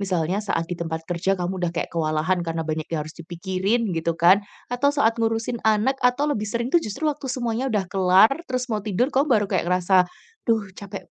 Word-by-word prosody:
misalnya 185 Hz, 0 st, 0 dB
saat 200 Hz, -5 st, -1 dB
di 175 Hz, -, -7 dB
tempat 165 Hz, -2 st, -4 dB
kerja 180 Hz, +3 st, 0 dB
kamu 180 Hz, +1 st, -3 dB
udah 175 Hz, -, +1 dB
kayak 170 Hz, 0 st, -4 dB
kewalahan 160 Hz, +2 st, 0 dB
karena 165 Hz, -1 st, -3 dB
banyak 155 Hz, 0 st, -3 dB
yang 155 Hz, -2 st, -2 dB
harus 155 Hz, -, -9 dB
dipikirin 190 Hz, +6 st, -2 dB
gitu 165 Hz, 0 st, -1 dB
kan, 180 Hz, +4 st, +6 dB, 0.3 s
atau 245 Hz, +3 st, +2 dB
saat 235 Hz, -5 st, +2 dB
ngurusin 225 Hz, +1 st, -1 dB
anak, 240 Hz, +6 st, +2 dB
atau 250 Hz, +3 st, +2 dB
lebih 210 Hz, -4 st, -3 dB
sering 235 Hz, +4 st, -2 dB
tuh 345 Hz, -, +5 dB
justru 215 Hz, +4 st, -5 dB
waktu 295 Hz, -3 st, -1 dB
semuanya 245 Hz, 0 st, -1 dB
udah 210 Hz, -5 st, 0 dB
kelar 190 Hz, +4 st, +5 dB, 0.2 s
terus 255 Hz, -1 st, -2 dB
mau 215 Hz, -, 0 dB
tidur 220 Hz, +7 st, 0 dB
kamu 280 Hz, +3 st, +2 dB
baru 215 Hz, -5 st, +3 dB
kayak 175 Hz, -1 st, 0 dB
ngerasa, 180 Hz, 0 st, +3 dB, 0.4 s
"Duh 215 Hz, -4 st, +1 dB
capek 200 Hz, +1 st, -8 dB
195 Hz, 205 wpm, -23 LUFS, 175-235 Hz, 0.4 s, kan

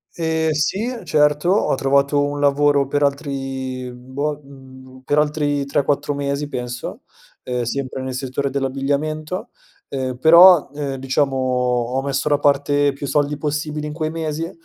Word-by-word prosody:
Ehm, 160 Hz, -1 st, 0 dB
sì 195 Hz, +11 st, -1 dB
certo 150 Hz, +2 st, +2 dB
ho 195 Hz, +4 st, +2 dB
trovato 140 Hz, +2 st, +2 dB
un 145 Hz, 0 st, -2 dB
lavoro 145 Hz, 0 st, +3 dB
per 145 Hz, +2 st, -1 dB
altri, 135 Hz, -3 st, -2 dB
mhmm, 125 Hz, +1 st, -14 dB
boh, 145 Hz, +2 st, -2 dB
mhmm, 130 Hz, -1 st, -14 dB
per 145 Hz, -, +1 dB
altri 150 Hz, -1 st, +1 dB
3-4 140 Hz, +1 st, 0 dB
mesi 140 Hz, 0 st, -2 dB
penso, 125 Hz, -, -6 dB, 0.4 s
ehm, 125 Hz, -1 st, -2 dB
sempre 130 Hz, +2 st, -3 dB
nel 130 Hz, 0 st, -4 dB
settore 130 Hz, +2 st, -3 dB
dell'abbigliamento. 140 Hz, +5 st, -2 dB, 0.4 s
Ehm, 130 Hz, -2 st, -3 dB
però, 170 Hz, +3 st, +7 dB
ehm, 140 Hz, -2 st, -3 dB
diciamo 135 Hz, +1 st, 0 dB
ho 125 Hz, -1 st, 0 dB
messo 140 Hz, +1 st, -1 dB
da 145 Hz, -1 st, +2 dB
parte 145 Hz, 0 st, +2 dB
più 140 Hz, +1 st, -6 dB
soldi 145 Hz, +1 st, 0 dB
possibili 150 Hz, 0 st, -3 dB
in 150 Hz, -, -5 dB
quei 155 Hz, -1 st, -2 dB
mesi 160 Hz, 0 st, -3 dB
140 Hz, 145 wpm, -20 LUFS, 135-150 Hz, 0.4 s, però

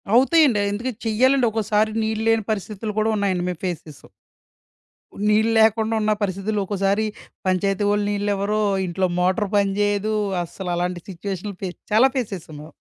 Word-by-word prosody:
అవుతాయండి. 265 Hz, -3 st, +5 dB
ఎందుకంటే 230 Hz, +2 st, -4 dB
చెయ్యాలండి 255 Hz, +4 st, +3 dB
ఒక్కోసారి 215 Hz, 0 st, +1 dB
నీళ్ళు 220 Hz, 0 st, -1 dB
లేని 225 Hz, -1 st, +3 dB
పరిస్థితులు 210 Hz, +1 st, -4 dB
గూడా 215 Hz, +1 st, +2 dB
ఉన్నాయండి. 190 Hz, -3 st, 0 dB
మేమ్ 180 Hz, -3 st, -6 dB
ఫేస్ 175 Hz, -3 st, -2 dB
చేశాం. 150 Hz, -2 st, -14 dB, 1.2 s
నీళ్ళు 220 Hz, +2 st, +3 dB
లేకుండా 220 Hz, 0 st, +3 dB
ఉన్న 215 Hz, 0 st, +1 dB
పరిస్థితుల్లో 200 Hz, +2 st, -1 dB
ఒక్కోసారి 200 Hz, +2 st, 0 dB, 0.4 s
పంచాయతీ 195 Hz, +2 st, +1 dB
వోళ్ళు 205 Hz, 0 st, +1 dB
నీళ్ళివ్వరు. 205 Hz, +1 st, 0 dB, 0.2 s
ఇంట్లో 185 Hz, +1 st, 0 dB
మోటర్ 190 Hz, +4 st, +1 dB
పని 200 Hz, -1 st, +2 dB
జేయదు. 205 Hz, +1 st, +1 dB, 0.3 s
అస్సల 180 Hz, +2 st, -7 dB
అలాంటి 175 Hz, 0 st, -2 dB
సిచ్యుయేషన్ 195 Hz, +2 st, -5 dB
ఫేస్ 180 Hz, -2 st, -4 dB, 0.2 s
చాలా 230 Hz, +5 st, +6 dB
ఫేస్ 250 Hz, -5 st, -1 dB
చేశాం 160 Hz, -3 st, -11 dB
మేము. 155 Hz, +2 st, -12 dB
205 Hz, 150 wpm, -22 LUFS, 190-220 Hz, 1.2 s, చాలా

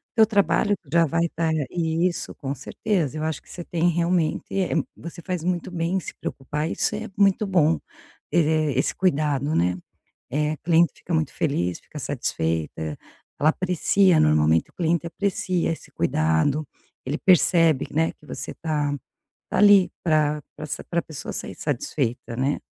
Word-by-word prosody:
teu 220 Hz, -1 st, +7 dB
trabalho 205 Hz, 0 st, +2 dB
que 150 Hz, -, -24 dB
já 170 Hz, 0 st, +5 dB
vai 165 Hz, +2 st, +1 dB
estar 165 Hz, -1 st, -1 dB, 0.2 s
isso 170 Hz, +1 st, -1 dB
com 135 Hz, -1 st, -4 dB
certeza, 155 Hz, -, -2 dB
eu 155 Hz, -, -3 dB
acho 160 Hz, -2 st, -2 dB
que -, -, -24 dB
você 175 Hz, -, -7 dB
tem 170 Hz, +1 st, +1 dB
realmente, 170 Hz, -1 st, +1 dB
eh, 185 Hz, -3 st, 0 dB, 0.2 s
você 170 Hz, +1 st, -9 dB
faz 180 Hz, -2 st, -3 dB
muito 180 Hz, 0 st, -2 dB
bem 170 Hz, 0 st, -1 dB
em -, -, +2 dB
se -, -, -8 dB
preocupar, 150 Hz, +4 st, -3 dB
isso -, -, 0 dB
é 220 Hz, +2 st, -5 dB
muito 200 Hz, +1 st, +3 dB
bom. 165 Hz, -4 st, +3 dB, 0.5 s
E, -, -, +1 dB, 0.4 s
esse 135 Hz, -, +1 dB
cuidado 150 Hz, -5 st, +1 dB
né. 90 Hz, +1 st, +2 dB, 0.6 s
Eh, 150 Hz, +3 st, 0 dB
cliente 170 Hz, 0 st, +4 dB
fica 175 Hz, -, -5 dB
muito 155 Hz, -1 st, 0 dB
feliz, 90 Hz, -, -1 dB
fica -, -, -11 dB
satisfeita, 80 Hz, -1 st, -2 dB, 0.4 s
ela 155 Hz, -, +4 dB
aprecia 185 Hz, +1 st, +3 dB
normalmente, 75 Hz, +1 st, +3 dB
o -, -, -33 dB
cliente 170 Hz, 0 st, 0 dB
aprecia 180 Hz, -1 st, -1 dB
esse 160 Hz, -, -9 dB
cuidado. 80 Hz, -, +1 dB, 0.4 s
Ele 145 Hz, +4 st, -2 dB
percebe, 165 Hz, -5 st, +4 dB
né, 160 Hz, +2 st, +1 dB
que 150 Hz, -, -22 dB
você -, -, -6 dB
tá 150 Hz, -3 st, -1 dB, 0.6 s
tá -, -, -1 dB
ali 205 Hz, -2 st, +7 dB
pra 150 Hz, -2 st, +2 dB
pra -, -, -8 dB
s 145 Hz, -1 st, -5 dB
para 170 Hz, -, -1 dB
a -, -, -1 dB
pessoa 155 Hz, -2 st, -7 dB
sair -, -, -5 dB
satisfeita, 125 Hz, -4 st, -2 dB
né? 135 Hz, +4 st, 0 dB
160 Hz, 165 wpm, -24 LUFS, 145-175 Hz, 0.6 s, teu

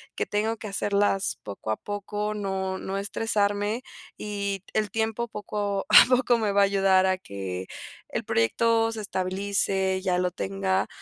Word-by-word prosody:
que -, -, -1 dB
tengo 220 Hz, +2 st, 0 dB
que 215 Hz, -, -7 dB
hacerlas 200 Hz, -6 st, +1 dB
poco 105 Hz, +1 st, -5 dB
a -, -, +1 dB
poco, 205 Hz, +1 st, -4 dB
no 190 Hz, -2 st, -2 dB
no 195 Hz, +1 st, -4 dB
estresarme", 205 Hz, +2 st, 0 dB, 0.4 s
y 200 Hz, -2 st, -3 dB
el 215 Hz, -1 st, +1 dB
tiempo 225 Hz, +1 st, -1 dB
poco, 205 Hz, -2 st, -3 dB
a -, -, +10 dB
poco 245 Hz, -1 st, +2 dB
me 215 Hz, -3 st, 0 dB
va 200 Hz, -, +4 dB
a -, -, +7 dB
ayudar 195 Hz, -1 st, +4 dB
a 185 Hz, 0 st, +2 dB
que 95 Hz, -, -6 dB, 0.4 s
el -, -, -3 dB
proyecto 225 Hz, -, +2 dB
se 220 Hz, -, -5 dB
estabilice, 190 Hz, 0 st, -1 dB
ya 180 Hz, -1 st, +1 dB
lo 180 Hz, 0 st, 0 dB
tenga, 195 Hz, 0 st, -1 dB
200 Hz, 160 wpm, -26 LUFS, 190-210 Hz, 0.4 s, a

